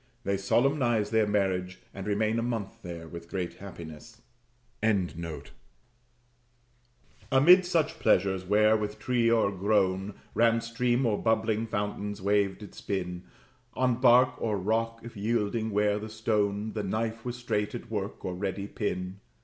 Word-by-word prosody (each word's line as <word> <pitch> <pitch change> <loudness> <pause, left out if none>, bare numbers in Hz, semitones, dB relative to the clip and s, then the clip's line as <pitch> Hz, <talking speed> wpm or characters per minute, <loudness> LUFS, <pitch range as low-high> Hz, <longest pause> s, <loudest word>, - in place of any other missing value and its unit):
They 100 -3 0
solemnize 120 +1 +1
their 110 -2 +3
marriage, 95 -3 0 0.2
and 95 +1 -7
remain 110 +2 +1
a - - 0
month 115 -2 -4
there 85 -4 -7
with 85 +1 -9
great 90 -2 -4
happiness.] 90 +3 -10 0.6
Amid 90 -7 -2 2.1
such 165 -4 0
pleasures, 95 0 +2
where, 105 +3 +4
with 105 -1 -2
tree 120 +1 +1
o'ergrown, 100 -2 +1 0.2
Ran 115 0 +3
stream, 120 +2 0
or 110 -3 +1
bubbling 110 0 +1
fountain's 105 -1 -3
wave 100 0 +1
did 105 - -11
spin, 90 -2 -4 0.5
On 125 -1 +1
bark 125 0 +5
or 110 -2 0
rock, 115 +4 -1
if 115 0 -10
yielding 110 +1 -1
were 105 0 +1
the 110 +1 -7
stone, 105 -1 -1
The 110 - -2
knife 110 +3 -2
was 125 -1 -4
straight 120 -2 -2
at 120 - -8
work, 100 -2 -4
or 90 - -2
ready 100 +1 -3
pin. 95 -2 -4
105 Hz, 140 wpm, -28 LUFS, 95-115 Hz, 2.1 s, bark